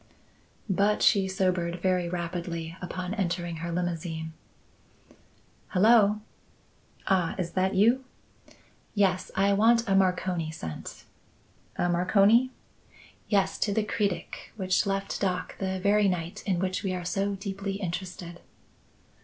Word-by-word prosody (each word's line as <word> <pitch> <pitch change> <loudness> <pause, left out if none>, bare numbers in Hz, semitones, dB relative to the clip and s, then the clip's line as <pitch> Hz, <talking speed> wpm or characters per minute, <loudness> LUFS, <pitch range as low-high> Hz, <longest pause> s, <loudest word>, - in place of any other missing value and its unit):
But 200 +2 +2
she 195 -3 +4
sobered 180 -2 0
very 180 -1 +1
rapidly 170 -1 -4
upon 180 +1 -4
entering 175 -4 -2
her 170 +1 -4
limousine. 165 -2 -3 1.3
"Hello!" 210 +1 +4 0.8
"Ah, 185 -3 +1
is 175 -2 -3
that 190 +1 0
you?" 235 +7 +4 0.9
"Yes, 190 -3 +2
I 200 +1 +3
want 230 +3 +4
a 195 - +2
Marconi 180 -3 +1
sent." 160 - -7 0.7
"A 175 - 0
Marconi?" 200 +8 +4 0.8
"Yes, 195 -3 +1
to 205 - +1
the 215 +2 +1
Cretic, 205 -3 -3
which 190 0 +1
left 195 0 -2
dock 185 -2 -1
the 190 -1 -2
very 205 +2 +3
night 175 -2 -3
in 190 -3 +1
which 185 +1 -1
we 190 -3 -2
are 180 -1 -5
so 195 +3 -1
deeply 195 0 -4
interested." 180 -2 -5
185 Hz, 120 wpm, -28 LUFS, 175-200 Hz, 1.3 s, she